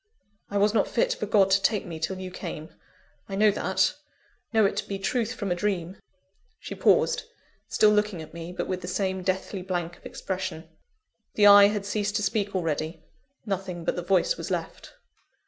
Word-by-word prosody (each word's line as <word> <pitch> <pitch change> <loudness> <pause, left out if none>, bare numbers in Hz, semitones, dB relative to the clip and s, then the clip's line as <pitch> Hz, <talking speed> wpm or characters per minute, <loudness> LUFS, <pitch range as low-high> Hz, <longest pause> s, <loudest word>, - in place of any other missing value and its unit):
I 205 - -2
was 205 +1 +3
not - - +2
fit - - +1
for - - -4
God 195 -2 +4
to 195 +1 +4
take 210 +1 +1
me 165 -2 -7
till 160 +4 -2
you 185 0 -6
came 165 -3 -7 0.6
I 195 - -3
know 210 +1 +5
that, 190 -1 +1 0.6
know 220 -2 +4
it 195 - +1
to - - -2
be 195 - -3
truth 230 +4 -1
from 200 -6 -3
a - - +2
dream." 185 -1 -2 0.6
She - - -7
paused, - - +3 0.4
still 215 - +4
looking 210 -3 +1
at 160 - -10
me, 170 +1 -7
but 180 - -3
with 185 -1 -3
the 180 - -7
same 190 0 -1
deathly 190 +1 -2
blank 175 -2 -3
of - - -26
expression. 185 -4 -5 0.7
The 210 - +4
eye 200 0 +10
had 205 -1 -2
ceased 205 0 -1
to 210 - 0
speak 205 0 -1
already; 160 -2 -2 0.4
nothing 190 -4 -4
but - - 0
the 175 - -3
voice 195 - +2
was - - -6
left. - - -5
190 Hz, 195 wpm, -26 LUFS, 180-205 Hz, 0.7 s, eye